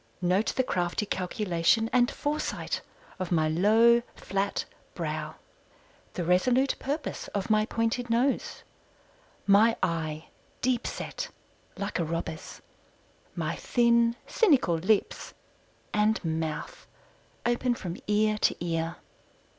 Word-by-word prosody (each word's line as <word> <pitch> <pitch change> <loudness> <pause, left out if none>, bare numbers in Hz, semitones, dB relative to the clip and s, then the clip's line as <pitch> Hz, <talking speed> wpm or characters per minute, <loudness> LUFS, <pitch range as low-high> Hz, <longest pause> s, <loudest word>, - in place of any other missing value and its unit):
Note 185 +4 +1
the 260 - +2
crafty 180 -2 -1
calculation 185 +2 +1
and 245 -1 +4
foresight 300 +1 -2 0.4
of 185 -1 -3
my 160 -2 +3
low, 220 +8 +5
flat 195 +1 -2 0.3
brow, - - -3 0.8
the 175 - -3
resolute 245 +10 +3
purpose 290 +4 -3
of 200 +2 -1
my 215 0 +3
pointed 235 +2 -1
nose; 245 +4 0 0.8
my 210 +3 +5
eye 160 -2 -2 0.3
deep 245 -1 0
set - - -5 0.5
like 200 -1 -3
a - - +2
robber's 160 0 -5 0.7
my - - -2
thin 235 -1 +3
cynical 285 - +3
lips, 185 +6 0 0.6
and 210 -2 +2
mouth 160 -1 -3 0.6
open 240 +1 +1
from 180 -6 -5
ear 215 0 +2
to - - +3
ear. 165 0 -2
210 Hz, 110 wpm, -28 LUFS, 175-235 Hz, 0.8 s, low